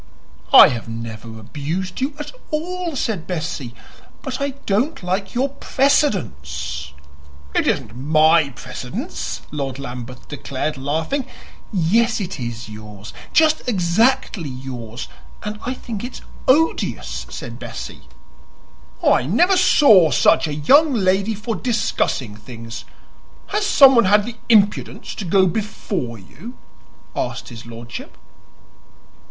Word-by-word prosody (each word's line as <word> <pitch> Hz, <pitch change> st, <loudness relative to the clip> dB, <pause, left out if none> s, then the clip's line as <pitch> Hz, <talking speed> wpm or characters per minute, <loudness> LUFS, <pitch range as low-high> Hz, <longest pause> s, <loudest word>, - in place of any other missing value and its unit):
"I -, -, +10 dB
have 115 Hz, -2 st, -5 dB
never 115 Hz, 0 st, -7 dB
abused 160 Hz, -, -4 dB
you 280 Hz, +2 st, -1 dB
at 295 Hz, -1 st, -6 dB, 0.2 s
all," 345 Hz, +1 st, -3 dB
said 215 Hz, -9 st, -2 dB
Bessie; 150 Hz, -8 st, -4 dB, 0.5 s
"but 265 Hz, -1 st, -4 dB
I 280 Hz, -1 st, -1 dB
don't 225 Hz, -, 0 dB
like 190 Hz, +3 st, -2 dB
your 265 Hz, +3 st, +1 dB
PRECEDENCE." 70 Hz, -, 0 dB, 0.6 s
"It -, -, +1 dB
isn't 110 Hz, -, -1 dB
my 155 Hz, +3 st, +4 dB
precedence!" 125 Hz, -, -6 dB
Lord 135 Hz, -3 st, -3 dB
Lambeth 125 Hz, -2 st, -8 dB
declared, 145 Hz, +1 st, -3 dB
laughing. 160 Hz, -, -2 dB, 0.4 s
"Yes, 220 Hz, +6 st, +2 dB
it 185 Hz, -5 st, -4 dB
is 120 Hz, -2 st, -5 dB
yours 105 Hz, -1 st, -10 dB, 0.2 s
just 315 Hz, -1 st, +4 dB
exactly 190 Hz, -, +2 dB
yours; 125 Hz, -3 st, -7 dB, 0.4 s
and 210 Hz, 0 st, -5 dB
I 255 Hz, -, -1 dB
think 225 Hz, -5 st, -6 dB
it's 245 Hz, +1 st, -7 dB, 0.3 s
odious," 315 Hz, +5 st, +1 dB
said -, -, -7 dB
Bessie. -, -, -7 dB, 1.0 s
"I -, -, +4 dB
never 370 Hz, +2 st, +4 dB
saw 215 Hz, -, +6 dB
such 140 Hz, +4 st, +4 dB
a 150 Hz, -, -3 dB
young 280 Hz, -, +5 dB
lady 195 Hz, +1 st, +2 dB
for 220 Hz, +2 st, -3 dB
discussing 210 Hz, -, -1 dB
things! 115 Hz, +2 st, -9 dB, 0.6 s
Has 420 Hz, 0 st, 0 dB
someone 265 Hz, -, +7 dB
had 205 Hz, +2 st, +4 dB
the 235 Hz, 0 st, -7 dB
impudence 205 Hz, -3 st, +2 dB
to 200 Hz, -, -6 dB
go 190 Hz, +2 st, +4 dB
before 185 Hz, -, -3 dB
you?" 185 Hz, -, -12 dB, 0.6 s
asked -, -, -3 dB
his 115 Hz, -1 st, -10 dB
lordship. 115 Hz, 0 st, -9 dB
180 Hz, 120 wpm, -21 LUFS, -, 1.0 s, I